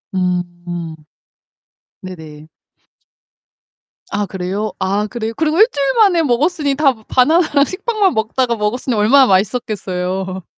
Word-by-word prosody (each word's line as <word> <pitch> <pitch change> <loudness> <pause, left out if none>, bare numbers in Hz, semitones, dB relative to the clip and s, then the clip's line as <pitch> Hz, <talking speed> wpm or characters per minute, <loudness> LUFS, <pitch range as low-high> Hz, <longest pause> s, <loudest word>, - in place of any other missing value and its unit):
음 175 -2 -3 1.1
네네. 185 - -8 2.0
아 205 0 -1
그래요? 190 +3 -4
아 200 +2 0
그래요? 225 0 -5
그리고 320 +3 0
일주일만에 350 - +3
먹었으니 290 +2 0
다 280 -3 +3
바나나랑 285 +1 +3
식빵만 405 0 0
먹다가 235 +2 0
먹었으니 225 +3 -2
얼마나 255 +6 +5
맛있었겠어요? 190 -3 -2
225 Hz, 265 characters per minute, -17 LUFS, 190-285 Hz, 2.0 s, 얼마나